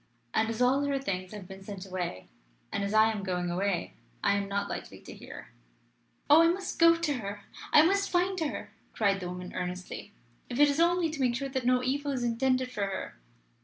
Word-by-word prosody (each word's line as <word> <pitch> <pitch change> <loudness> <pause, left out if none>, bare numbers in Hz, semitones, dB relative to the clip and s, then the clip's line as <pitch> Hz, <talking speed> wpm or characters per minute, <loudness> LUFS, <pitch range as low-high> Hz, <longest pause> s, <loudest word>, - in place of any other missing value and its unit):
And, 220 0 +2
as 230 +2 0
all 265 +3 +3
her 280 -1 0
things 185 -8 -3
have 205 -4 -8
been 190 0 -10
sent 195 -1 -7
away, 180 - -4 0.4
and 200 - -1
as 200 - -2
I 215 +1 +5
am 215 -2 -4
going 180 -2 -2
away, 190 +1 -1 0.3
I 200 - +4
am 200 0 -1
not 200 0 -1
likely - - -6
to - - -11
hear." - - -11 0.8
"Oh 300 +3 +8
I 330 - +6
must 370 +2 -2
go 335 0 +7
to 330 -3 -1
her. 205 -1 -6 0.3
I 300 - +8
must 395 +4 +2
find 365 +1 +1
her!" 315 -3 -3 0.2
cried 200 -2 +2
the 180 -2 -5
woman 180 0 -7
earnestly; 180 +2 -5 0.4
"if 245 - -3
it 290 0 +7
is 285 +2 0
only 340 -1 +3
to 305 -3 -4
make 245 -2 +2
sure 275 +2 -3
that 260 -2 -2
no 250 0 +3
evil 285 +3 -1
is 255 -3 -2
intended 255 +2 +1
for 205 -5 -1
her." 190 - -5
230 Hz, 215 wpm, -29 LUFS, 195-285 Hz, 0.8 s, Oh